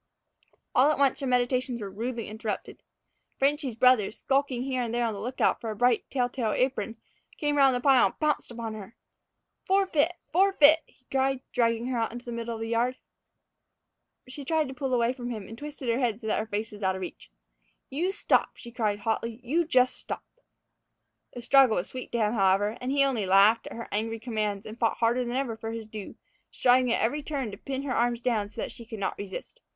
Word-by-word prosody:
All 265 +4 +5
at - - -1
once 275 -2 +2
her 275 - -3
meditations 250 0 +1
were 200 -3 -6
rudely 230 +2 -4
interrupted. 220 0 -5 0.6
"Frenchy's" 275 -3 +1
brother, 245 -3 +5
skulking 270 +1 0
here 260 -1 -1
and 235 -2 -2
there 240 0 +1
on 225 - -1
the 200 - -6
lookout 250 +4 0
for 230 - -4
a 215 - -4
bright, 245 +2 +2
telltale 245 -3 -1
apron, 230 -4 -1 0.4
came 295 -1 0
round 270 -3 +5
the 245 - -1
pile 265 -5 +5
and - - -10
pounced 305 -1 0
upon 230 -2 -5
her. 215 +1 -9 0.7
"Forfeet! 370 -4 +2 0.2
forfeet!" 335 -4 +6
he 255 - -29
cried, 270 -1 +1
dragging 230 -1 +1
her 250 -2 -1
out 225 - -1
into 240 +1 -8
the 240 - -6
middle 235 0 -4
of 225 - -7
the 225 - -3
yard. 240 +2 +1 1.3
She 265 +3 -8
tried 310 +1 +1
to - - -6
pull 265 0 -3
away 240 0 +2
from 245 -2 -6
him, 215 -5 -5
and 225 - -9
twisted 290 0 -8
her 235 +2 +1
head 235 -4 0
so 230 - -11
that 220 - +1
her 215 - -3
face 215 +1 -3
was 210 0 -11
out 190 -1 +1
of 190 - -6
reach. 180 - -8 0.6
"You 340 +8 0
stop," 400 - +1
she 235 - -10
cried 215 -3 0
hotly; 225 +1 -2
"you 330 +7 +1
jus' 255 -4 +4
stop!" - - -6 1.1
The 245 - -7
struggle 265 -2 +5
was 175 - -2
sweet 255 -1 -7
to - - +1
him, 215 -1 +1
however, 200 0 +2
and 250 +1 -2
he 280 0 +4
only 245 -8 0
laughed 200 +4 +5
at - - -8
her 230 - -6
angry 225 +2 -1
commands 215 -3 -2
and 220 +2 -9
fought 230 - +1
harder 235 +2 +2
than 240 0 -3
ever 260 -4 -1
for 225 0 -6
his 225 -1 -5
due, 215 -2 -8 0.4
striving 250 0 +3
at - - +1
every 290 +7 0
turn 275 -6 -3
to 200 - -8
pin 270 +4 -4
her 275 -3 -2
arms 240 0 +1
down 225 -4 0
so - - -7
that - - -4
she 235 - -11
could 225 -1 -8
not 200 - -2
resist. 200 - -7
240 Hz, 220 wpm, -28 LUFS, 220-265 Hz, 1.3 s, forfeet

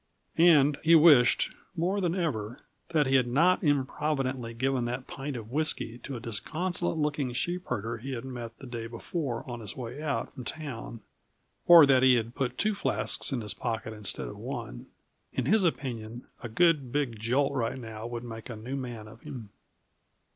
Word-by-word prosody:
And 150 -4 +6
he 165 +1 +6
wished, 150 -7 +6 0.2
more 185 +4 0
than 175 -1 0
ever, 125 - -2 0.3
that 155 -3 +2
he 135 - 0
had 130 -2 +4
not 170 +10 +3
improvidently 135 -4 0
given 130 0 0
that 125 +2 -3
pint 140 0 -6
of 115 -1 -7
whisky 140 -5 0
to 135 +2 -7
a - - -5
disconsolate 165 - -2
looking 145 -4 0
sheep 175 +8 -2
herder 115 +2 -3
he 135 +4 -5
had 120 0 -5
met 120 -3 -7
the - - -11
day 120 -2 -5
before 120 +2 -4
on 120 -1 -5
his 105 -4 -8
way 125 +3 -6
out 150 -3 -2
from 130 - -8
town; 120 -5 -6 0.7
or 170 -3 +10
that 135 -2 +5
he 130 -1 +6
had 115 0 -1
put 125 -2 -2
two 215 +1 +2
flasks 200 - 0
in 130 -3 -1
his 105 -3 -2
pocket 110 -1 -3
instead 100 - -4
of - - -8
one. - - -6 0.5
In - - -1
his 215 -1 +4
opinion 120 -8 -2 0.2
a 120 - -6
good, 150 -1 +3
big 135 -6 -1
jolt 135 +6 +1
right 125 -2 -1
now 110 -2 -7
would 120 0 -5
make 115 +1 -8
a 120 - -5
new 120 +5 -6
man 120 -5 -6
of 110 +2 -14
him. 125 -9 -8
130 Hz, 185 wpm, -29 LUFS, 115-150 Hz, 0.7 s, or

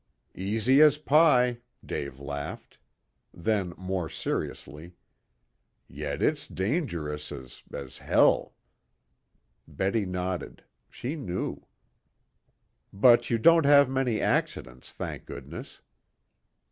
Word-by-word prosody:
"Easy 110 +8 +2
as 150 -1 +6
pie," 140 -6 +4 0.3
Dave 70 -2 -5
laughed. 70 0 -7 0.5
Then 95 -1 -1
more 95 -3 -3
seriously, 80 +5 -5 0.9
"Yet - - -4
it's - - 0
dangerous 85 - -3
as 65 -3 -9
as 70 -2 -8
hell." - - +3 1.1
Betty 100 +1 -1
nodded. 90 0 -4 0.3
She 130 +6 -5
knew. 95 - -4 1.2
"But 120 +4 +5
you 115 - +2
don't 165 +4 +5
have 140 -2 +7
many 130 -4 0
accidents, 65 0 -2
thank - - -7
goodness." 70 +4 -9
95 Hz, 95 wpm, -27 LUFS, 80-130 Hz, 1.2 s, have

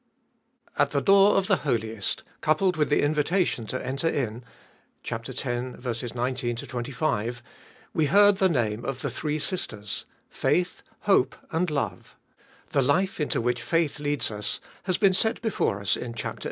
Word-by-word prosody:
AT - - +4
the - - +1
door 195 +1 +6
of 195 - +2
the 195 -1 +3
Holiest, 110 -7 -2 0.2
coupled 180 +4 +2
with 150 -2 +1
the 145 - +3
invitation 150 - +1
to 130 +2 -4
enter 135 +5 -1
in 125 -6 -1 0.6
(x. 120 +4 -4 0.7
19 125 -1 -1
25), 120 -1 -2 0.5
we 160 - +2
heard 205 +3 +6
the 190 -1 +4
name 115 -7 0
of 135 -1 -4
the - - -1
three 150 -1 -2
sisters 110 - -3
— - - -41
Faith, 180 0 0 0.2
Hope, 165 -11 +3 0.2
and 165 +2 +1
Love. 145 -2 -3 0.6
The 140 - +3
life 175 +10 +1
into 150 - 0
which 120 0 0
faith 160 +2 0
leads 145 -4 0
us 105 0 -3 0.3
has 185 -2 +1
been 195 -2 +4
set 220 +4 +3
before 205 - 0
us 100 - +1
in 120 -1 -6
chap. 110 - -4
xi. - - -15
145 Hz, 160 wpm, -26 LUFS, 120-180 Hz, 0.7 s, door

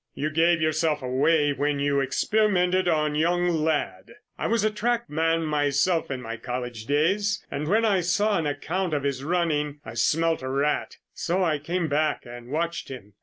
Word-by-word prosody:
You 150 +2 -2
gave 165 +2 +3
yourself 155 -2 +1
away 145 +4 +2
when 145 +1 0
you 140 0 +1
experimented 185 +4 +1
on 155 -3 +1
young 175 +3 +1
Ladd. 155 - -1 0.2
I - - -2
was 230 -2 +1
a 215 - +2
track 235 +2 -1
man 165 +1 +1
myself 150 +3 +1
in 130 -2 -4
my 115 0 -5
college 120 -2 -5
days 195 +9 +1
and 150 +1 -3
when 220 +6 +3
I 200 -4 +3
saw 205 +4 +1
an 160 - -1
account 160 +4 -2
of 145 - -2
his 135 -1 -2
running, 150 -3 0
I 110 - -7
smelt 165 +8 +1
a 130 - -4
rat, 140 +2 -1 0.2
so 180 +3 -1
I 155 -4 +1
came 170 +3 -2
back 150 -1 0
and 120 0 -10
watched 170 +4 -2
him. 105 -6 -10
155 Hz, 180 wpm, -25 LUFS, 140-175 Hz, 0.2 s, gave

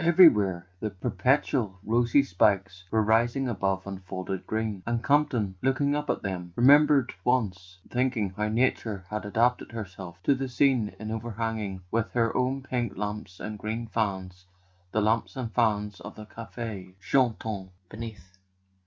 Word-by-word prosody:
Everywhere 105 - +6
the 110 - -2
punc¬ 125 +7 +1
tual 110 -9 -1
rosy 120 +5 +3
spikes 95 -4 +1
were 110 -1 +2
rising 120 +5 +2
above 95 -4 -1
unfolding 95 -1 -5
green; 110 -3 -2
and 115 0 -1
Campton, 140 -9 +2
looking 135 +2 +2
up 150 0 -3
at - - -1
them, 90 -3 -4
remembered 140 0 +5
once 100 -7 0
thinking 125 -6 0
how 105 +3 -2
Nature 110 -4 0
had 105 0 -3
adapted 120 +4 +1
herself 95 -5 -7
to 140 - +4
the 135 0 -3
scene 125 -4 +2
in 110 +1 -5
overhanging 110 -4 -3
with 115 -1 -1
her 115 -2 +1
own 130 +1 0
pink 120 -6 -2
lamps 105 -2 -5
and 105 0 -6
green 110 +3 -3
fans 95 -5 -3 0.4
the 110 - +1
lamps 110 +5 +1
and 125 -4 -4
fans 105 -4 +1
of 85 - -9
the 110 - -9
cafes 110 -4 -7
chantants 110 -3 0 0.2
beneath. 95 -4 -9
110 Hz, 150 wpm, -27 LUFS, 95-125 Hz, 0.4 s, Everywhere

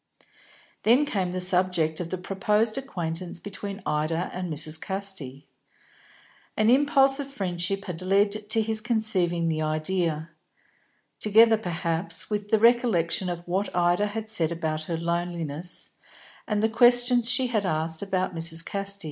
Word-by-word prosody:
Then 245 +7 +4
came 190 -9 -2
the 185 - -3
subject 180 -3 +1
of 175 -2 -4
the 185 - -3
proposed 210 +4 0
acquaintance 175 -10 -5
between 200 +1 -7
Ida 160 +4 -1
and 180 -1 -4
Mrs. 155 +1 +1
Casti. 190 -9 -4 1.1
An 215 +2 +4
impulse 275 0 +4
of 280 - -4
friendship 195 -5 -2
had 175 -2 -6
led 200 +2 +2
to 215 +1 -1
his 220 0 0
conceiving 195 -8 0
the 155 -1 -1
idea; 155 +1 -2 0.9
together, 220 +2 +5
perhaps, 175 -2 -3
with 210 0 -2
the 220 - +4
recollection 215 -6 +2
of 175 0 -6
what 190 +3 -2
Ida 175 +3 +2
had 220 +1 -5
said 170 -7 0
about 155 -2 -3
her 165 0 -3
loneliness, 170 -1 -3 0.6
and 210 0 0
the - - +5
questions 245 +1 +4
she 250 +1 +3
had 215 -2 +1
asked 160 -2 -1
about 190 -2 -2
Mrs. 165 0 +1
Casti. 200 0 -2
185 Hz, 145 wpm, -26 LUFS, 170-215 Hz, 1.1 s, together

